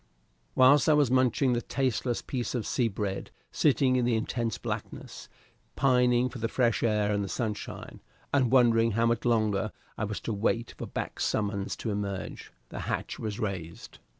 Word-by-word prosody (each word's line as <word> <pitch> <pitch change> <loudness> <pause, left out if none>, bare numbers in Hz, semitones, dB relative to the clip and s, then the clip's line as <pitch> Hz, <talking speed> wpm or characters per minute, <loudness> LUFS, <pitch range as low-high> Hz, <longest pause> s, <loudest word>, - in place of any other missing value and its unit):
Whilst 135 +3 +6
I - - +6
was 145 -4 +3
munching 130 0 +3
the 120 - 0
tasteless 125 -1 -1
piece 125 -1 -3
of 120 - -2
sea 120 - +1
bread, 100 -2 -3 0.2
sitting 135 -3 +3
in 125 - +2
the 120 -1 +2
intense 115 0 -2
blackness, - - -6 0.5
pining 125 -2 +3
for 125 0 -8
the 115 - 0
fresh 120 -1 +1
air 105 -2 +2
and 100 0 0
the 100 - -5
sunshine, 105 +2 -5 0.3
and 130 -4 +3
wondering 115 -3 +4
how 115 +2 +2
much 115 0 0
longer 110 -3 +1 0.3
I 110 - 0
was 105 0 -4
to 115 - -3
wait 115 +3 -1
for - - -6
Back's - - -4
summons 100 -2 -1
to 110 - -4
emerge, 100 -2 -4 0.2
the - - -7
hatch - - -3
was 105 -2 -4
raised. 90 -6 -5
115 Hz, 175 wpm, -28 LUFS, 105-125 Hz, 0.5 s, Whilst